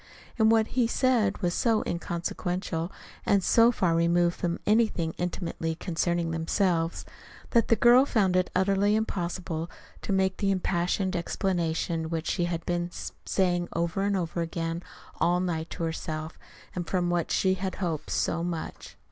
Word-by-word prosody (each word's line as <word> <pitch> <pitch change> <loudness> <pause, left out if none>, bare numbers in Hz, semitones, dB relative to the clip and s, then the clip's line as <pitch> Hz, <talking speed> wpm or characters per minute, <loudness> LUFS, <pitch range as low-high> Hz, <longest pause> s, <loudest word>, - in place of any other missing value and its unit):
And 220 0 +5
what 225 -1 +3
he 245 -2 +2
said 235 -5 +2
was 175 -1 +1
so 225 +1 +2
inconsequential 175 0 -3 0.3
and 200 -2 +3
so 230 +4 +5
far 180 -7 +1
removed 170 +1 +3
from 170 -1 -2
anything 210 -7 +2
intimately 170 -2 -2
concerning 170 0 -1
themselves, 165 0 0 0.5
that 235 -2 +3
the 230 - +4
girl 245 +4 +6
found 195 -8 +2
it 185 0 +2
utterly 200 +2 +3
impossible 175 -5 -2 0.3
to - - -4
make 190 -1 +1
the 200 - 0
impassioned 185 0 0
explanation 170 -2 -1
which 165 -1 -2
she 175 - 0
had 170 -1 -3
been 175 0 -1 0.4
saying 175 -2 +1
over 170 +3 -1
and 200 0 +1
over 170 -1 -2
again 165 0 -3 0.4
all 175 +1 +3
night 165 -3 -2
to - - -5
herself, 160 -1 -4 0.3
and 175 -2 -4
from 175 -2 +1
which 175 -1 0
she 190 -1 +2
had 190 0 -3
hoped 165 -5 -3
so 170 - 0
much. 170 -2 -5
175 Hz, 155 wpm, -28 LUFS, 170-195 Hz, 0.5 s, girl